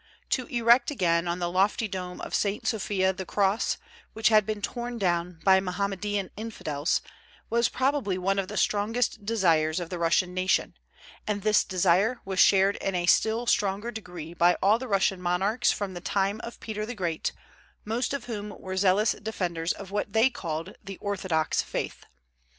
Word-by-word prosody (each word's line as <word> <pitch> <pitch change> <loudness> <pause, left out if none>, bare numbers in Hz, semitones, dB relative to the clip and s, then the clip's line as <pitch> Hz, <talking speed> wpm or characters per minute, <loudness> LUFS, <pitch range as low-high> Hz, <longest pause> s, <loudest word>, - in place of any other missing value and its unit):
To 255 - 0
erect 235 +1 +4
again 175 - +1
on 170 0 -1
the 175 -1 -2
lofty 200 +4 +2
dome 180 -2 -6
of - - -7
St. 205 0 0
Sophia 195 -3 +1
the 190 0 -5
cross, 200 +3 +1 0.4
which 220 0 +3
had 215 -3 +4
been 215 -1 -2
torn 240 +3 -4
down 175 -3 -1
by 190 -1 +6
Mohammedan 200 +1 -2
infidels, 170 -8 -2 0.5
was 235 0 +3
probably 260 -8 0
one 195 +2 0
of 190 - -2
the 210 - -6
strongest 215 0 0
desires 165 -7 +2
of 175 0 -6
the 180 - -4
Russian 180 +2 +2
nation; 185 0 +1 0.5
and 205 -2 -2
this 215 -1 +4
desire 190 +6 +2
was 190 -1 -3
shared 195 +1 +5
in 195 - -2
a 175 -1 0
still 225 +6 +3
stronger 205 +1 0
degree 180 -7 -8
by 175 0 +4
all 210 +4 +3
the 260 - -6
Russian 195 -3 +1
monarchs 195 +7 +1
from 200 -2 -3
the 175 - -7
time 200 +3 0
of 235 - -8
Peter 215 -1 -4
the 245 +3 -5
Great, 170 -5 -2 0.5
most 230 +4 -1
of 280 -2 -3
whom 210 -3 -5
were 185 0 -5
zealous 200 +3 +3
defenders 180 -6 -2
of 195 -1 -7
what 205 0 -2
they 225 +4 +4
called 165 -3 -5
the 195 -1 -8
Orthodox 185 -6 0
faith. - - -5
195 Hz, 175 wpm, -27 LUFS, 180-220 Hz, 0.5 s, by